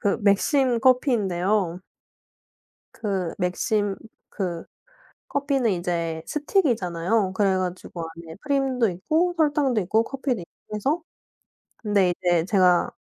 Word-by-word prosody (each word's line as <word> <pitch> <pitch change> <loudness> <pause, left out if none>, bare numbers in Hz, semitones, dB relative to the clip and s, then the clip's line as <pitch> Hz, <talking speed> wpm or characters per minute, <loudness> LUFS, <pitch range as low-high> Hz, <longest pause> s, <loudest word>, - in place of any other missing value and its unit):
그 200 - +1
맥심 235 +5 +3
커피인데요. 205 - +2 1.1
그 190 -6 -2
맥심 200 +2 0 0.3
그 175 -4 -4 0.6
커피는 275 -5 +1
이제 170 -2 -2
스틱이잖아요. 220 - 0
그래 195 -1 +2
가지고 180 -2 -4
안에 165 -1 -10
프림도 270 -5 +1
있고 315 - 0
설탕도 290 -6 +2
있고 220 +5 +2
커피도 260 -5 -3
있고 190 +4 -11
해서. 280 - 0 0.8
근데 205 -4 +2
이제 175 -2 +3
제가 180 -3 +3
205 Hz, 245 characters per minute, -24 LUFS, 180-260 Hz, 1.1 s, 맥심